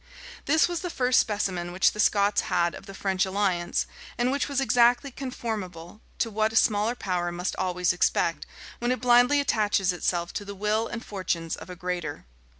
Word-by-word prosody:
This 315 +3 +4
was 350 -1 -3
the 355 - -4
first 255 -5 +2
specimen 185 -5 -1
which 185 +2 +3
the 210 - -10
Scots 205 -1 +3
had 170 0 +1
of 195 - -11
the 195 - -9
French 190 -1 0
alliance, 190 -3 0 0.3
and 245 +1 +1
which 280 +1 -1
was 280 -1 0
exactly 245 +2 +3
conformable 215 -8 -6 0.2
to 230 - -1
what 215 +1 +1
a - - -8
smaller 215 +2 +3
power 180 -6 -2
must 175 +1 -3
always 180 -1 0
expect, 170 -1 0 0.3
when 240 +1 0
it 255 - -1
blindly 245 +3 +5
attaches 210 -8 +1
itself 175 -1 -1
to - - -4
the 200 0 -8
will 210 +3 0
and 235 0 -6
fortunes 170 -5 -3
of - - -11
a 180 - -7
greater. 180 -4 -4
205 Hz, 185 wpm, -26 LUFS, 180-240 Hz, 0.3 s, blindly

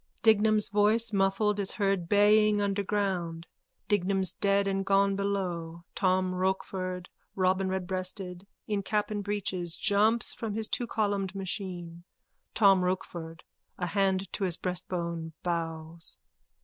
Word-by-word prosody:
Dignam's 215 -1 +4
voice, 215 +2 +2
muffled, 200 +2 +2
is 195 -1 +1
heard 195 -4 0
baying 210 +1 +5
under 200 0 0
ground:_ 185 -5 -1 0.4
Dignam's 195 -2 +1
dead 200 0 +1
and 195 0 0
gone 195 0 +3
below. 180 -4 -3
Tom 185 -1 +1
Rochford, 185 -1 -2 0.3
robinredbreasted, 185 0 -1 0.2
in 205 -2 -1
cap 210 +2 -1
and 205 -1 -2
breeches, 185 -4 -2
jumps 215 +3 +3
from 220 -3 -4
his 220 -1 0
twocolumned 205 -5 -1
machine.) 180 -3 -4 0.5
TOM 195 -4 +5
ROCHFORD: 170 -3 -4 0.4
_(A 180 -1 -1
hand 195 0 +1
to 200 - -2
his 175 -2 -1
breastbone, 170 -2 -3
bows.) 165 -1 -3
195 Hz, 120 wpm, -29 LUFS, 180-205 Hz, 0.5 s, baying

